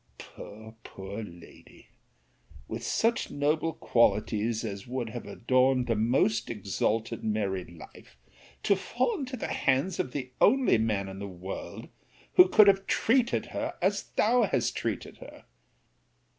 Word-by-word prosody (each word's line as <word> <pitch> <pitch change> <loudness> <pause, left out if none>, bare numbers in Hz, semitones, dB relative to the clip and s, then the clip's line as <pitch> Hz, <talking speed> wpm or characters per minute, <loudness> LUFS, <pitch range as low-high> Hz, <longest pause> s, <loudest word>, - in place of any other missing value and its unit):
Poor, 110 +1 -11
poor 95 +3 -7
lady! 85 -5 -14 0.8
With - - -6
such 230 +1 0
noble 150 +3 0
qualities 110 0 +1
as 100 -1 -6
would 125 -2 -3
have 120 - -7
adorned 130 +1 +2
the 120 - +1
most 115 0 +1
exalted 110 +2 -2
married 100 -4 -2
life, 80 -6 -14 0.5
to 200 - +4
fall 255 - -1
into 260 -2 -5
the - - -4
hands 140 +8 +1
of 130 - -2
the 130 -2 -5
only 260 - +4
man 105 -3 0
in 95 0 -8
the 100 - -5
world, 95 0 -7 0.5
who 365 0 +8
could 215 - +7
have 195 -1 +3
treated 240 +1 +2
her - - -3
as - - 0
thou 240 +3 +3
hast 210 - 0
treated - - -4
her! - - -13
120 Hz, 140 wpm, -28 LUFS, -, 0.8 s, who